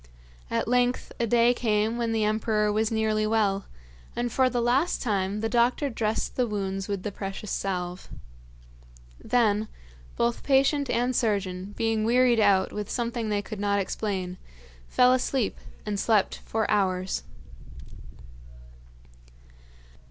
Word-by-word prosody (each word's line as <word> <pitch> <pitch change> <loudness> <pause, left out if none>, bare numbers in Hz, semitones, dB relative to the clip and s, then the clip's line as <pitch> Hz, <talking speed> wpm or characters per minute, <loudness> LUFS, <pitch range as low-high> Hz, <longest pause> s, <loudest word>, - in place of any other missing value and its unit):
At - - -1
length 245 +1 +1
a 235 - +1
day 235 +2 +4
came 220 -1 0
when 235 -1 -1
the 220 -1 +1
emperor 215 0 +1
was 215 +1 +1
nearly 215 -1 +1
well, 205 -3 +1 0.5
and 240 0 -2
for 260 +1 +3
the 245 -1 -1
last 250 +8 +1
time 200 -2 -1
the 225 - 0
doctor 245 +4 +1
dressed 220 -1 -2
the 250 -2 +1
wounds 195 -2 -3
with 200 -3 -3
the 210 - -3
precious 195 +1 -6
salve. 180 -1 -3 1.1
Then, 215 -3 +2 0.5
both 235 0 0
patient 275 0 +2
and 245 +2 0
surgeon, 200 -3 -1
being 225 -1 0
wearied 240 +1 +4
out 195 -3 +3
with 210 -1 -4
something 235 -2 -2
they 205 -1 0
could 215 0 -7
not 200 0 +1
explain, 190 -2 -3 0.5
fell 250 0 +4
asleep 255 -2 0 0.3
and 205 -2 -2
slept 215 -3 +2
for 220 -1 0
hours. 185 -2 0
215 Hz, 135 wpm, -26 LUFS, 200-240 Hz, 1.1 s, day